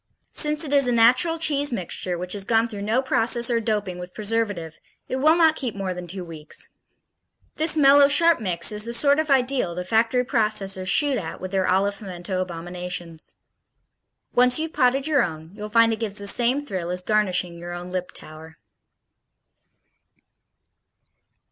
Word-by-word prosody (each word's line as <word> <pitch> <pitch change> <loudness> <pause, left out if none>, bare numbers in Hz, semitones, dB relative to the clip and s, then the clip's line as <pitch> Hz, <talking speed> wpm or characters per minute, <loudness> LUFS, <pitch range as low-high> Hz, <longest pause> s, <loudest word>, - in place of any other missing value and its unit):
Since 300 +1 +3
it 290 -2 -4
is 280 -2 +4
a - - +1
natural 250 +8 +4
cheese 290 -3 0
mixture, 180 -3 -4
which 180 +1 -3
has 200 -1 -2
gone 225 +2 +1
through 210 -3 -8
no 225 +6 0
process 235 -1 +1
or 230 - +1
doping 210 -5 -3
with 180 0 -9
preservative, 205 -7 -3 0.3
it 260 - -3
will 310 +4 +4
not 325 -2 +4
keep 250 -8 -4
more 195 -2 -3
than 180 0 -8
two 185 +2 -5
weeks. 160 -3 -7 0.9
This 315 +1 +1
mellow 280 -1 +6
sharp 330 +2 +3
mix 180 -5 +1
is 210 0 -1
the 235 - -3
sort 280 +5 +4
of 315 -1 -2
ideal 255 -9 +1
the 180 - -4
factory 225 +6 +1
processors 210 -6 0
shoot 275 +4 +3
at 165 -3 -7
with 185 0 -7
their 190 -1 0
olive 200 +2 0
pimiento 185 -1 -5
abominations. 175 -1 -6 1.0
Once 250 0 +5
you've 320 0 -2
potted 265 -1 +1
your 300 -4 +2
own, 160 -4 -5
you'll 210 0 -8
find 230 +1 +4
it 220 - -5
gives 210 -3 -2
the 200 - -1
same 240 +6 +2
thrill 190 -11 -5
as 180 0 -3
garnishing 185 -4 0
your 175 +1 -8
own 175 +1 -7
Liptauer. 160 -3 -8
215 Hz, 170 wpm, -23 LUFS, 180-260 Hz, 1.0 s, mellow